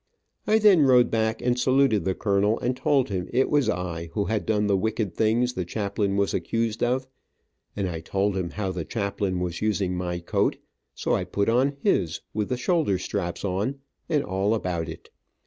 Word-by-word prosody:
Then 210 -4 +6
I - - +5
rode 125 -3 +5
back 110 0 0
and 125 0 +1
saluted 130 -7 +3
the 95 -1 0
colonel 105 +1 +1
and 125 +1 -1
told 135 -1 +1
him 95 -3 -3
it 130 +2 +2
was 145 -3 +3
I 85 -2 -3
who 100 - 0
had 110 -1 -2
done 105 -1 +2
the 100 -1 +2
wicked 110 -1 -1
things 120 +3 +1
the 90 - -2
chaplain 100 +1 -2
was 100 -1 +1
accused 115 -1 -1
of, 130 +2 +1 0.7
and 100 -2 -1
I 85 -2 -4
told 95 +4 -1
him 90 -2 -2
how 95 +1 -3
the 90 -2 -4
chaplain 100 -2 -2
was 90 -1 -3
using 100 -4 0
my 90 -1 -2
coat, 85 - 0 0.4
so - - -1
I - - +1
put 100 +2 -1
on 135 +4 +2
his, 90 - +1
with 105 -1 -2
the 125 - -1
shoulder 125 - +1
straps 90 0 -3
on, 100 +8 -1 0.3
and 150 -2 +2
all 95 +4 0
about 85 -6 -2
it. 80 - -10
105 Hz, 195 wpm, -25 LUFS, 95-125 Hz, 0.7 s, Then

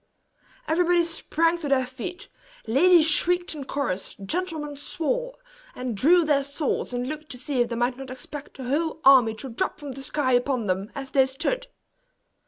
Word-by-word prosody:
Everybody 345 +1 +3
sprang 330 0 0
to 300 -4 -4
their 260 -2 +3
feet 355 +10 -7 0.4
ladies 320 +8 +5
shrieked 350 +3 +2
in 290 -3 -7
chorus, 250 -10 -3
gentlemen 310 - -3
swore - - -2 0.4
and 250 -3 -4
drew 330 - +5
their 290 -2 +3
swords, 280 0 -2
and 245 0 -2
looked 305 +1 -6
to - - -9
see 260 0 -1
if 240 - +1
they 235 - -3
might 240 +2 0
not 270 -1 -8
expect 270 +3 -9
a 265 - -7
whole 310 +5 -1
army 250 -5 +7
to 265 +4 -6
drop 230 - -2
from 290 -2 -7
the 265 +1 -8
sky 270 -1 0
upon 245 -1 +1
them, 190 +2 -2
as 275 -1 -6
they 265 -1 +4
stood. 335 - -2
280 Hz, 180 wpm, -25 LUFS, 255-330 Hz, 0.4 s, army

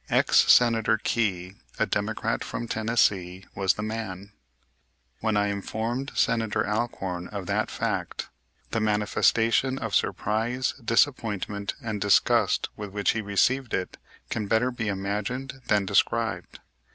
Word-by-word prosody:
Ex - - +5
Senator 115 -2 +4
Key, 95 -5 -1 0.2
a - - +2
Democrat - - -1
from 120 - -5
Tennessee, 100 -5 0
was 95 -2 +1
the 105 - -4
man. 105 -3 -5 0.9
When 110 -2 0
I 105 0 +2
informed 115 +6 -3
Senator 110 -4 +1
Alcorn 95 -5 -2
of 100 -3 -6
that - - 0
fact - - -3 0.4
the 115 - 0
manifestation 110 +4 +2
of 115 -5 -4
surprise, 115 +4 0
disappointment, 110 -5 0
and 110 -3 -3
disgust 100 0 +3
with 105 -1 -6
which 100 +1 +1
he 115 - -2
received 120 +5 +1
it 90 - -4 0.3
can 110 -3 -2
better 115 +4 +2
be 115 -3 -4
imagined 105 +7 -3
than 105 -2 +2
described. - - 0
110 Hz, 130 wpm, -26 LUFS, 100-115 Hz, 0.9 s, Ex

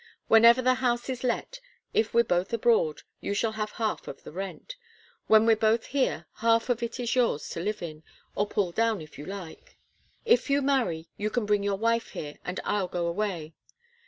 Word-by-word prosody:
Whenever 235 +3 +7
the 255 +1 +4
house 240 0 0
is 255 -1 -4
let, 255 - -2 0.3
if 220 0 +1
we're 235 - +4
both 180 -3 0
abroad, 225 -9 +2 0.2
you 200 - -3
shall 220 +2 +1
have 215 -1 -4
half 220 -1 -2
of 135 - -8
the - - -10
rent. 195 - -6 0.5
When 220 0 +6
we're 225 -1 +5
both 220 +1 +2
here, 275 -1 -1
half 230 +1 +2
of 240 -1 +1
it 235 +1 -4
is 240 0 -1
yours 235 - +1
to - - -5
live 205 +2 -3
in 155 -2 -7 0.3
or 205 - 0
pull 200 -4 0
down, 225 +2 +1
if 155 -2 -12
you 150 - -8
like. 190 -4 -9 0.5
If 465 -8 +3
you 280 0 +2
marry, 240 -13 0
you 210 +1 -1
can 235 0 -1
bring 205 -1 +2
your 200 -1 0
wife 230 +2 0
here, 145 -1 -7
and 180 - -4
I'll 205 -3 0
go 175 -1 -2
away. 170 -3 -2
220 Hz, 200 wpm, -27 LUFS, 185-235 Hz, 0.5 s, Whenever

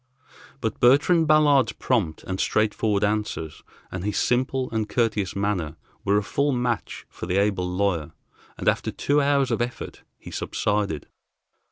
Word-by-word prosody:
But 110 -2 -2
Bertrand 150 +7 +4
Ballard's 150 -3 +4
prompt 105 -12 -1
and 95 0 -4
straightforward 110 -1 +1
answers, 105 -7 -2 0.3
and 95 -1 -5
his 105 0 -2
simple 130 +1 +1
and 110 -2 -2
courteous 105 -5 0
manner, 95 -6 -1 0.3
were 100 +1 +2
a 105 - +1
full 140 +8 0
match 120 - -2
for - - -8
the 90 +1 0
able 100 -3 +1
lawyer, 90 -5 0 0.5
and - - -5
after - - +2
two 145 +1 +1
hours 140 -2 +2
of 115 - 0
effort 120 0 -5 0.2
he - - -11
subsided. 100 -8 -1
105 Hz, 150 wpm, -24 LUFS, 100-125 Hz, 0.5 s, Bertrand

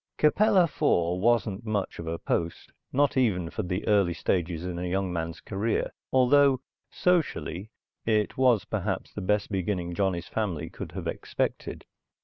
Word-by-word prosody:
Capella 195 +5 +5
IV 90 - +1
wasn't 115 -2 +2
much 105 -3 -2
of 85 - -6
a 85 +1 -2
post, 85 0 -2 0.2
not 145 +1 +2
even 90 -10 +1
for - - -2
the 90 +2 -3
early 100 -5 +3
stages 85 -2 -1
in 90 -1 -3
a 90 0 -2
young 95 0 -1
man's 85 -1 -3
career, 105 +3 -1 0.2
although, 130 +1 +5 0.3
socially, 145 - 0 0.3
it 105 -2 +1
was 125 -6 +3
perhaps - - -3
the - - -5
best 105 +3 0
beginning 90 -2 -1
Johnny's 90 -2 -1
family 85 -8 -2
could - - -8
have - - -5
expected. - - -3
100 Hz, 150 wpm, -27 LUFS, 85-120 Hz, 0.3 s, Capella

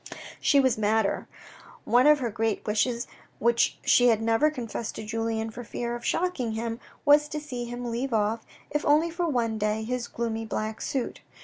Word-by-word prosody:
She 285 - +4
was 260 -5 +2
madder. 215 0 +1 0.6
One 250 +4 +5
of 300 0 +7
her 235 -3 -1
great 225 0 -1
wishes 235 +3 0 0.3
which 235 +1 +2
she 245 - +5
had 225 -3 +4
never 225 +6 +3
confessed 235 -5 -5
to - - -6
Julien 225 0 -2
for 245 +3 -8
fear 240 +1 -4
of 240 - -8
shocking 310 -11 -1
him, 230 +1 -3 0.3
was 295 +1 +6
to 300 - -4
see 255 -5 -5
him 240 +1 -6
leave 240 +3 -2
off, 220 +1 +1 0.3
if 295 - 0
only 310 +3 +3
for 345 +1 -1
one 230 -5 0
day, 215 +1 0
his 245 +1 -3
gloomy 225 -1 -3
black 220 0 -3
suit. 265 -3 -3
235 Hz, 185 wpm, -27 LUFS, 225-260 Hz, 0.6 s, of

